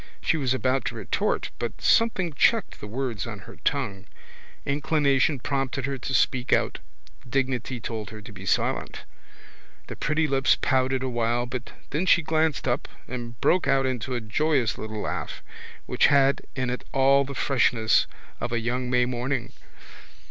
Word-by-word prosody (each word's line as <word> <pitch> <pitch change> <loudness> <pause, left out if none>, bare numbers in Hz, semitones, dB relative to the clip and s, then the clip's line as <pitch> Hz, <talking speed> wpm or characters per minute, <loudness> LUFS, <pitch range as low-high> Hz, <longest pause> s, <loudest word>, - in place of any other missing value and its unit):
She - - +1
was 135 -5 0
about 130 0 +1
to - - -2
retort - - -1
but 120 - -4
something 190 -8 +3
checked 225 +10 +2
the 105 - -6
words 120 -1 -3
on 105 -3 -6
her - - -13
tongue. 110 -7 -2 0.6
Inclination 140 0 +2
prompted 135 0 -2
her 135 -1 -3
to 135 - -4
speak 125 -1 +1
out: - - +2 0.5
dignity 130 -1 -1
told 110 -3 -5
her 110 +1 -9
to 105 +1 -11
be 95 -1 -10
silent. - - 0 0.8
The - - -7
pretty 155 +1 +1
lips 135 -1 +3
pouted 130 -1 +1
awhile 120 -1 0
but 125 0 -6 0.2
then 160 +6 -1
she 175 - +5
glanced 155 -2 +1
up 120 +2 0 0.2
and 120 -2 -6
broke 180 -5 +3
out 135 -1 +3
into 130 -1 -2
a 120 - -2
joyous 125 +2 +1
little 110 -1 -5
laugh - - -4 0.4
which - - +3
had 140 -1 +4
in 130 -2 -1
it 125 - -4
all 135 +1 +4
the 140 0 -7
freshness 120 -5 +3 0.3
of 120 - -3
a 120 - +1
young 125 +2 -2
May 125 0 +3
morning. 125 0 -2
130 Hz, 165 wpm, -26 LUFS, 120-140 Hz, 0.8 s, she